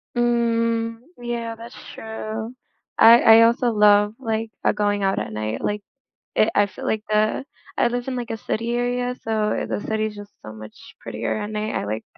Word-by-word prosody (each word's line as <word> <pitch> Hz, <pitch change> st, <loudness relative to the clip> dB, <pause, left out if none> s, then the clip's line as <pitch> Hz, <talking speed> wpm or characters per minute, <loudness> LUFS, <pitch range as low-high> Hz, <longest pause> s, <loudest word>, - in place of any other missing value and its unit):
Mm, 230 Hz, -1 st, +1 dB, 0.2 s
yeah, 235 Hz, -1 st, -4 dB
that's 230 Hz, +1 st, -11 dB, 0.2 s
true, 220 Hz, +1 st, -6 dB, 0.5 s
I 230 Hz, +2 st, +8 dB
I 225 Hz, 0 st, +8 dB
also 235 Hz, +1 st, +3 dB
love, 210 Hz, -1 st, +4 dB
like, 225 Hz, -3 st, -3 dB
uh, -, -, +4 dB
going 205 Hz, -1 st, 0 dB
out 195 Hz, 0 st, +1 dB
at -, -, -4 dB
night, 110 Hz, +1 st, -4 dB
like, 210 Hz, 0 st, -1 dB, 0.6 s
i 215 Hz, -, +4 dB
I 205 Hz, -, +4 dB
feel 200 Hz, -, -9 dB
like 215 Hz, -1 st, -1 dB
the 215 Hz, +3 st, +1 dB, 0.3 s
I -, -, +3 dB
live 245 Hz, +1 st, -4 dB
in 260 Hz, -, -2 dB
like 240 Hz, -2 st, -5 dB
a 225 Hz, -, -2 dB
city 230 Hz, +3 st, -2 dB
area, 245 Hz, +1 st, -1 dB
so 215 Hz, -1 st, -1 dB
the -, -, -2 dB
city 220 Hz, +1 st, -1 dB
is 210 Hz, -, -7 dB
just 205 Hz, 0 st, -11 dB
so 110 Hz, -, -9 dB
much 110 Hz, 0 st, -13 dB
prettier -, -, -3 dB
at 210 Hz, -, -5 dB
night, 215 Hz, 0 st, -3 dB
I -, -, -2 dB
like 110 Hz, +2 st, -4 dB
220 Hz, 190 wpm, -22 LUFS, 210-235 Hz, 0.6 s, I